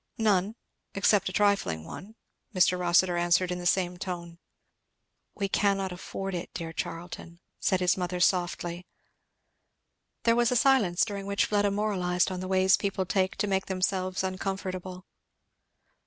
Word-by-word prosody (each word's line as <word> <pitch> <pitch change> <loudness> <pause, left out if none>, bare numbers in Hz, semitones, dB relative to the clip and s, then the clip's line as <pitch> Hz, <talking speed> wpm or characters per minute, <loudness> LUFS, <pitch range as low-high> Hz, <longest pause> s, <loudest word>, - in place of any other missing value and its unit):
"None 210 -2 +1 0.4
except 200 0 +3
a - - -6
trifling 200 - +1
one," 190 - -10 0.4
Mr. 180 0 +3
Rossitur 175 0 +3
answered 175 +1 +2
in 180 - -3
the 175 - -2
same 180 -1 +1
tone. 170 -2 -6 1.0
"We 200 - -1
cannot 195 -1 +1
afford 195 +2 -5
it, 175 -1 -5
dear 165 -2 -5
Charlton," 170 0 -6 0.2
said 185 -1 +1
his 180 +1 +2
mother 180 0 -2
softly. 175 -1 0 1.4
There 230 0 +4
was 240 0 +3
a - - +1
silence, 230 -9 +3
during 200 -2 -6
which 200 0 +1
Fleda 205 -1 +1
moralized 190 -3 0
on 185 - -4
the 185 - -5
ways 190 0 +4
people 195 -1 -2
take 190 0 0
to - - -1
make 190 -1 0
themselves 185 0 -1
uncomfortable. 185 -1 -4
185 Hz, 145 wpm, -28 LUFS, 180-200 Hz, 1.4 s, There